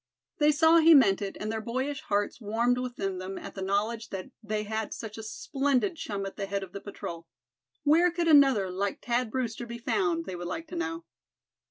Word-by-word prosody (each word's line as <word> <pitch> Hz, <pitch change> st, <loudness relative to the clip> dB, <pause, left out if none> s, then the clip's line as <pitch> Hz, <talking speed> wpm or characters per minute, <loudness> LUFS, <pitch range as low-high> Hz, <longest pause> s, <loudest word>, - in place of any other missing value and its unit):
They 300 Hz, 0 st, +5 dB
saw 320 Hz, +2 st, +5 dB
he 325 Hz, 0 st, +8 dB
meant 210 Hz, -9 st, +5 dB
it, 200 Hz, -1 st, -4 dB
and 215 Hz, +1 st, -3 dB
their 220 Hz, 0 st, -2 dB
boyish 260 Hz, +5 st, -3 dB
hearts 205 Hz, +3 st, -1 dB
warmed 235 Hz, +4 st, +1 dB
within 200 Hz, -7 st, -3 dB
them 190 Hz, +1 st, -5 dB
at -, -, -8 dB
the 195 Hz, -, -7 dB
knowledge 210 Hz, +4 st, -1 dB
that 195 Hz, +6 st, -6 dB
they 215 Hz, -1 st, -2 dB
had 220 Hz, +1 st, -3 dB
such 215 Hz, -2 st, -7 dB
a 225 Hz, -, -7 dB
splendid 275 Hz, -, 0 dB
chum 200 Hz, -9 st, -4 dB
at 195 Hz, -, -7 dB
the 195 Hz, -, -3 dB
head 200 Hz, 0 st, -2 dB
of 190 Hz, -, -9 dB
the 200 Hz, +1 st, -7 dB
patrol. 170 Hz, -4 st, -7 dB, 0.6 s
Where 325 Hz, +4 st, +5 dB
could 345 Hz, -1 st, -1 dB
another 270 Hz, -, +5 dB
like 195 Hz, +2 st, -2 dB
Thad 245 Hz, -1 st, +1 dB
Brewster 240 Hz, -1 st, -3 dB
be 235 Hz, 0 st, -6 dB
found, 335 Hz, -, 0 dB
they 185 Hz, -, -5 dB
would 175 Hz, 0 st, -5 dB
like 325 Hz, -, -4 dB
to 355 Hz, -, -7 dB
know? 330 Hz, 0 st, -3 dB
230 Hz, 210 wpm, -28 LUFS, 200-285 Hz, 0.6 s, he